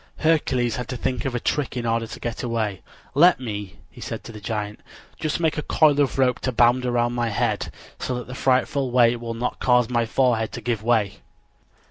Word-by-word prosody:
Hercules 130 -7 +2
had 125 - -4
to 125 - -4
think 125 +1 -2
of 130 -2 -2
a - - 0
trick 140 +1 -1
in 120 - -2
order 115 0 0
to - - -9
get 120 -1 -4
away. 110 -5 -2 0.3
"Let 170 +4 +6
me," 105 -6 -5 0.2
he - - -13
said - - -5
to - - -9
the 105 -2 -10
giant, 105 -1 -4 0.4
"just 155 0 -1
make 160 -2 +1
a - - -1
coil 150 -1 +3
of 140 - 0
rope 130 -2 +2
to 130 - -1
bind 120 +1 +3
around 120 0 +1
my 120 -1 0
head, 100 - -1 0.3
so 125 - -2
that 125 - -5
the 125 - -8
frightful 130 +1 +1
weight 120 -1 +4
will 115 -1 -5
not 120 +2 -3
cause 125 -2 +3
my 120 -1 +1
forehead 115 -2 +1
to - - -5
give 120 -4 -1
way." 110 -3 +1
120 Hz, 215 wpm, -23 LUFS, 115-130 Hz, 0.4 s, Let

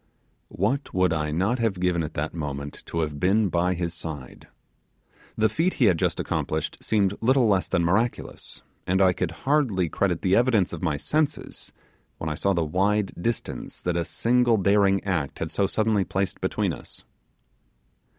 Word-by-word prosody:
What 125 +8 -1
would 90 -2 +3
I 75 -1 -1
not 95 +11 0
have 110 -5 0
given 90 -2 +1
at 80 - -5
that - - -2
moment 70 -3 -5
to 85 - -2
have 75 -2 -3
been 100 +4 +3
by 90 +2 +1
his 85 0 -2
side. 75 -7 -8 0.9
The 110 - +4
feat 165 +12 0
he 125 - +3
had 90 -6 +4
just - - 0
accomplished 80 -1 -2
seemed 100 -3 +2
little 130 +1 +4
less 95 -3 +2
than 85 - +1
miraculous, 110 +8 -1 0.2
and 95 +1 +2
I 95 -2 +5
could 90 -1 -2 0.2
hardly 125 - +2
credit 90 -2 0
the 95 0 +3
evidence 115 -8 +3
of 85 - -5
my 80 -5 0
senses 150 - -2 0.5
when 80 - -3
I - - 0
saw 100 +6 +1
the 85 -2 0
wide 100 +5 +1
distance 115 +5 -3
that 90 -1 -1
a 85 - +1
single 120 +4 +2
daring 100 0 +3
act 85 -8 -2
had - - -4
so 100 - +1
suddenly 110 0 +1
placed 95 +1 -2
between - - 0
us. - - -8
95 Hz, 175 wpm, -25 LUFS, 85-110 Hz, 0.9 s, I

